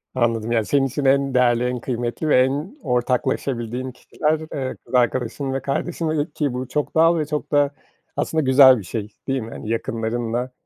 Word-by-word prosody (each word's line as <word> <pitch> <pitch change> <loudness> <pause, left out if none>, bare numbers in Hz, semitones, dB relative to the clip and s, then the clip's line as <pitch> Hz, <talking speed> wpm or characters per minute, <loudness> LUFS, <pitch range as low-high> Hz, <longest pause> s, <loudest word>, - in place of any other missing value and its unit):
Anladım, 115 -2 0
ya, 115 -2 +2
senin 140 +2 +2
için 140 +2 -3
en 135 0 +3
değerli, 120 -1 +3
en 125 0 -1
kıymetli 120 +4 -3
ve 125 - +6
en 145 - -1
ortaklaşabildiğin 125 0 -1
kişiler, 150 +5 -1
eee, 130 -2 -3
kız - - -15
arkadaşın 125 +2 0
ve 135 - -2
kardeşin, 155 +2 -1
ki 145 -5 -3
bu 125 0 -4
çok 150 +4 -2
doğal 165 +1 +5
ve 155 - 0
çok 150 0 -4
da 145 -1 +3 0.5
aslında 160 - 0
güzel 130 0 +7
bir 100 - -8
şey, 105 +3 -4 0.2
değil 135 -1 0
mi? 110 - -7
Hani, 110 - -7
yakınlarınla, 115 +2 -2
130 Hz, 180 wpm, -22 LUFS, 120-145 Hz, 0.5 s, güzel